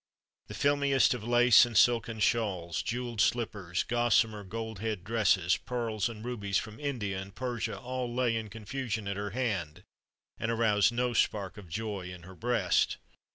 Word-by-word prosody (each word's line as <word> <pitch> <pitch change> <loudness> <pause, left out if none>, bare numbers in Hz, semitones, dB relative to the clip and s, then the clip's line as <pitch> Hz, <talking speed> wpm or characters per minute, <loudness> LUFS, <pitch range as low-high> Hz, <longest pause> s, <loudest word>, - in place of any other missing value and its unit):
The - - -8
filmiest 140 -2 +3
of 120 -4 -6
lace 120 +1 +6
and 120 -2 -1
silken 115 -2 +3
shawls, 95 -7 0
jeweled 120 -2 -2
slippers, 100 -7 0
gossamer 115 -3 +2
gold 110 +1 -6
head 110 -4 -3
dresses, 95 -4 +2
pearls 115 -3 -2
and 110 -1 -9
rubies 105 -5 -1
from 110 0 -5
India 110 -10 -3
and 95 +1 -11
Persia 125 -3 -3
all 125 -1 -4
lay 120 -1 +1
in 110 -1 -3
confusion 110 0 -4
at 100 - -2
her 100 +1 -3
hand, 95 -8 -3 0.6
and 110 - -2
aroused 110 -2 +3
no 120 +1 0
spark 100 -4 0
of 100 -5 -12
joy 100 -1 -4
in 90 -1 -10
her 95 +2 -11
breast. 115 -2 +1
110 Hz, 160 wpm, -30 LUFS, 100-120 Hz, 0.6 s, lace